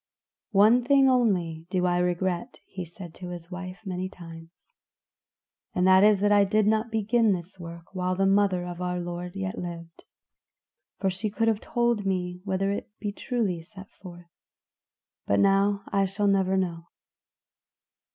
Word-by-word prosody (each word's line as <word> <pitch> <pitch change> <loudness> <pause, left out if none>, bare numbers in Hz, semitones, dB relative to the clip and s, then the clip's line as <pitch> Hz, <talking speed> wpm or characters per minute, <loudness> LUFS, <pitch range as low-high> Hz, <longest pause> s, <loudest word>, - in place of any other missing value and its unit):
"One 215 +5 +5
thing 275 +1 +5
only 180 -11 +1
do 180 -1 0
I 175 0 +2
regret," 180 +4 -1
he 185 -2 -7
said 170 0 -10
to 180 0 -8
his 175 0 -9
wife 185 +2 -7
many 185 0 -3
times, 165 - -13 1.0
"and 180 - +2
that 190 +1 +6
is 210 -2 +5
that 205 0 +3
I 205 -1 +6
did 210 +2 +2
not 220 +2 +1
begin 220 0 +2
this 185 +1 -7
work 170 0 -10
while 185 -1 -1
the 195 +1 +1
mother 195 -2 +2
of 175 0 -7
our 180 0 -2
Lord 175 +1 -6
yet 190 -1 -4
lived; 170 -1 -8 0.9
for 195 -1 0
she 200 +4 -3
could 225 +2 -1
have 220 -2 +2
told 235 -3 0
me 180 -2 -2
whether 195 0 0
it 200 - -4
be 205 - -3
truly 205 -6 -2
set 190 +3 -13
forth; 175 -2 -13 1.0
but 100 - +2
now 200 +1 +3
I 195 0 +2
shall 195 +2 -2
never 190 -1 +2
know." 170 -3 -2
190 Hz, 160 wpm, -26 LUFS, 175-205 Hz, 1.0 s, that